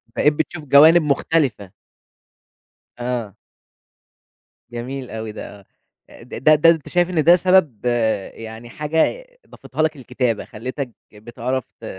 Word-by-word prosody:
بقيت 150 - +3
بتشوف 155 +1 -4
جوانب 155 +5 +7
مختلفة. 140 - 0 1.3
آه. 120 -4 -4 1.4
جميل 125 +2 -6
أوي 110 -1 -5
ده، 100 -2 -11 0.4
آه. - - -15
د - - -10
د 155 +1 +6
ده 165 - +7
أنت 165 -3 +1
شايف 175 0 +1
إن 165 -4 +1
ده 170 +3 +7
سبب 180 - +2
آآ، 110 -5 0
يعني 115 +1 -10
حاجة 160 - -1 0.2
ضافتها 155 - -6
لك 155 -1 +1
الكتابة، 125 -4 -2
خَلِّتَك 130 +3 -6 0.2
بِتِعرَف 120 +4 -4 0.2
ت - - -9
130 Hz, 130 wpm, -20 LUFS, 115-155 Hz, 1.4 s, جوانب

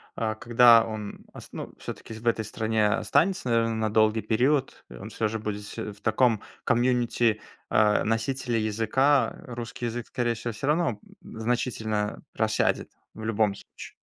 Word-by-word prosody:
а 110 -2 -1
когда 120 0 +6
он 110 -2 -7
ос - - -11
ну, - - -7
всё-таки - - -8
в 110 +1 -10
этой 115 -2 +1
стране 110 -1 0
останется, 125 - +1
наверное, 115 -1 +2
на 110 -1 0
долгий 110 0 +3
период, 125 +6 0
э, - - -11
он - - -8
всё 110 - -1
же 110 +1 -3
будет 105 -1 -4
всь 105 - -10
в 105 -1 -6
таком 110 0 +2 0.2
комьюнити, 120 -2 +2 0.3
а, 105 -1 +3
носителя 120 +2 -1
языка, 115 +7 +2
русский 120 0 -5
язык, 120 +1 -5
скорее 120 -1 -1
всего, 115 +1 -5
всё 110 +6 -5
равно, 150 -8 +1 0.2
м, - - -11
значительно 110 -3 -1
просядет - - 0 0.2
в 110 - -8
любом 110 -2 +1
случае. - - -12
115 Hz, 160 wpm, -26 LUFS, 110-120 Hz, 0.3 s, когда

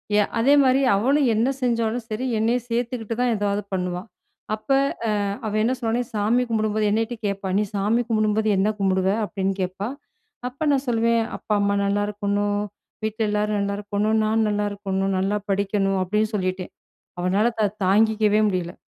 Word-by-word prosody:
ய 210 - +4
அதேமாரி 270 +1 +4 0.2
அவளும் 270 +4 +2
என்ன 235 +5 +2
செஞ்சாலும் 230 -1 0
சரி 220 +4 -3
என்னை 230 +2 +2
சேர்த்துக்கிட்டு 230 -1 -2
தான் 245 -1 +2
எதாவது 205 0 0
பண்ணுவா. 180 -1 -2 0.5
அப்ப 220 - -21 0.4
அ - - +2 0.4
அவ 210 - -3
என்ன 250 +3 +2
சொன்னானா 235 +1 0
சாமி 220 +4 +2
கும்பிடும்போது 215 -1 0
என்னக்கிட்ட 225 +2 0
கேட்பா! 195 -1 -3
நீ - - +2
சாமி 210 +4 +2
கும்பிடும்போது 215 0 +1
என்ன 200 +3 +2
கும்பிடுவ. 190 -1 +2 0.2
அப்பிடின்னு 195 -1 -2
கேட்பா! 185 +3 -3 0.6
அப்ப 280 +5 -4
நான் 275 0 +1
சொல்லுவேன், 230 0 +2
"அப்பா, 215 - -3
அம்மா 200 0 +1
நல்லாயிருக்கணும், 205 0 0 0.4
வீட்ல 220 0 -1
எல்லாரும் 210 0 0
நல்லாயிருக்கணும். 205 +2 -1
நான் 220 0 +2
நல்லாயிருக்கணும். 200 -2 -1
நல்லா 205 +2 0
படிக்கணும்" 195 -1 0
அப்பிடின்னு 210 +4 0
சொல்லிட்டேன். 185 -1 -3 0.5
அவனால 200 +6 +2
தா 210 - +4 0.2
தாங்கிக்கவே 215 +1 +3
முடியல. 180 -2 -2
210 Hz, 145 wpm, -23 LUFS, 200-225 Hz, 0.6 s, ய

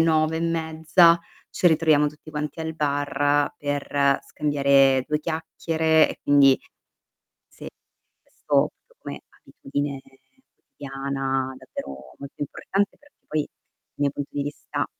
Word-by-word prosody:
9 160 -1 +2
e - - -3
mezza 165 +1 +3 0.3
ci - - +1
ritroviamo 155 -3 +4
tutti 150 +1 -8
quanti 150 0 -4
al 160 0 -4
bar 145 -1 +1
per 145 -1 +1
scambiare 140 -3 +3
2 150 0 -1
chiacchiere 160 0 +1
e - - -8
quindi 140 -2 +5 0.9
sì, - - -12 0.5
questo - - 0 0.3
come - - -8 0.2
abitudine 140 0 -5 0.5
quotidiana 135 -1 -4
davvero 65 - -9
molto 140 0 -10
importante 195 +7 -2
perché 290 0 -25
poi, 155 -1 -1
dal - - -57
mio 145 -1 0
punto 145 0 -6
di 145 - -2
vista 145 +1 -4
145 Hz, 120 wpm, -24 LUFS, 140-160 Hz, 0.9 s, quindi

